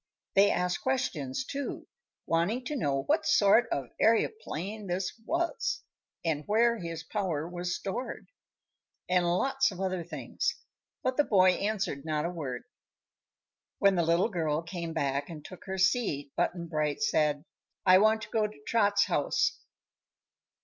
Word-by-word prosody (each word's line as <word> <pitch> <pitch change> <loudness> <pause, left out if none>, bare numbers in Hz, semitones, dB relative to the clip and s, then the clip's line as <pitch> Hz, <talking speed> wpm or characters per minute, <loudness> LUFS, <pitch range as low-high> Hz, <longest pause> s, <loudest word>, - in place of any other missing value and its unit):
They 200 +1 +6
asked 180 0 0
questions, 265 0 -1
too, 280 0 -5 0.4
wanting 195 +10 0
to 300 - -3
know 140 - 0
what - - +1
sort 220 +4 +5
of 140 - 0
an 120 - -19
aëroplane 220 - 0
this 180 +1 -2
was, 455 +10 -1 0.4
and 155 -2 0
where 230 +2 +3
his 165 -2 -5
power 175 -7 -2
was 175 0 -3
stored, 235 +6 -5 0.8
and 180 -1 +2
lots 270 +10 +2
of 185 -3 -9
other 185 -2 -1
things; 175 - -3 0.5
but 255 0 0
the 295 - +5
boy 185 -7 +5
answered 195 -8 -2
not 155 -1 -1
a 170 - -1
word. 135 -8 -5 1.1
When 200 0 +4
the 175 - +2
little 170 +5 +2
girl 160 -5 -1
came 170 -1 -5
back 140 -1 -1
and 155 -3 -9
took 185 - -11
her 190 -1 -4
seat 185 - +1
Button 175 -1 -1
Bright 155 +2 -1
said: 150 -7 +1 0.4
"I 185 0 +8
want 220 +1 +3
to 210 - -8
go 215 -1 +1
to 210 - -14
Trot's 205 -3 +3
house." - - +1
185 Hz, 150 wpm, -29 LUFS, 165-220 Hz, 1.1 s, I